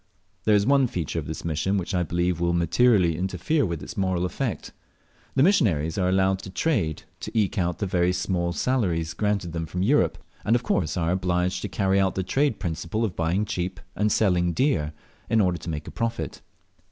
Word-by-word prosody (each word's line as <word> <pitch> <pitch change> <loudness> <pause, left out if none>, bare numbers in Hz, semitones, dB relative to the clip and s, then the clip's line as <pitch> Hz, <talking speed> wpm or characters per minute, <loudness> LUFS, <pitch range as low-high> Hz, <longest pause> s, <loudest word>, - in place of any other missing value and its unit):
There 105 - +5
is 100 -1 +3
one 140 -1 +4
feature 85 -9 -3
of - - -6
this - - -6
mission 85 +5 0
which 95 +1 -3
I 90 - +2
believe 85 +1 0
will 85 0 +1
materially 85 +1 +3
interfere 95 - 0
with 85 -3 -4
its - - -8
moral 95 -3 0
effect. 90 - -3 0.6
The 135 - +4
missionaries 100 - +3
are 90 -2 +1
allowed 95 0 +2
to 95 - -8
trade 95 - 0 0.2
to - - -6
eke 100 -3 +1
out 90 -1 0
the 100 - -2
very 90 -1 +2
small 90 -1 -1
salaries 85 -9 0
granted 105 -5 -1
them 80 -1 -3
from 90 +3 -2
Europe, 140 +9 +3 0.3
and 115 - +3
of 120 - 0
course 90 -9 0
are 85 -1 +1
obliged 90 -1 0
to - - -4
carry 95 -1 +1
out 95 -1 +1
the 95 - -1
trade 135 +5 +1
principle 85 +6 -2
of 95 - -4
buying 85 +6 0
cheap 95 -2 -3 0.2
and 105 +1 +1
selling 90 -4 +2
dear, 100 - +1 0.4
in 115 0 +3
order 90 -4 +2
to 85 - -7
make 75 -1 -4
a - - -6
profit. 115 - -3
90 Hz, 200 wpm, -25 LUFS, 85-105 Hz, 0.6 s, There